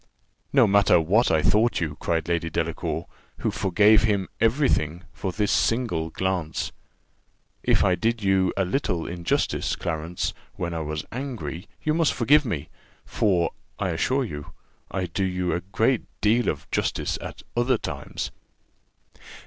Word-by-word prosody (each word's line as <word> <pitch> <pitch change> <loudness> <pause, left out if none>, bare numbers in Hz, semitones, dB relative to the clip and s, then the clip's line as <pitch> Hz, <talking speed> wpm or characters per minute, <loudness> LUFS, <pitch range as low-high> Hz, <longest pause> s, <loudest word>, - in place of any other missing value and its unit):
"No 135 -4 +6
matter 100 -3 +5
what 100 +9 +3
I 80 -1 +2
thought 105 +9 +3
you," 80 -4 -2
cried 80 -1 -1
Lady 85 -1 0
Delacour, - - -2 0.4
who - - +1
forgave 105 +3 +4
him 100 -4 +1
every 125 +6 +3
thing 80 -1 0
for 95 - -3
this 105 +1 0
single 85 -2 +1
glance; 90 -3 -2 0.9
"if - - +3
I 90 - +4
did 115 +3 0
you 95 -1 +3
a 95 - +2
little 90 - -1
injustice, 85 -1 -1
Clarence, 80 +1 -3 0.2
when 85 -3 -3
I 80 - -2
was 75 -1 -4
angry, 125 -9 -5 0.2
you 155 - +2
must 165 -1 +2
forgive 145 +5 +4
me; 80 - -3 0.4
for, 90 -6 +1 0.3
I 95 - -1
assure 130 +11 +1
you, 75 -9 -7 0.4
I 95 -1 -2
do 90 +3 -2
you 90 -1 0
a 90 - -1
great 110 +6 +1 0.2
deal 115 +3 +3
of - - -3
justice - - -1
at - - -8
other 120 +1 +2
times." - - -5
95 Hz, 150 wpm, -25 LUFS, 85-115 Hz, 0.9 s, No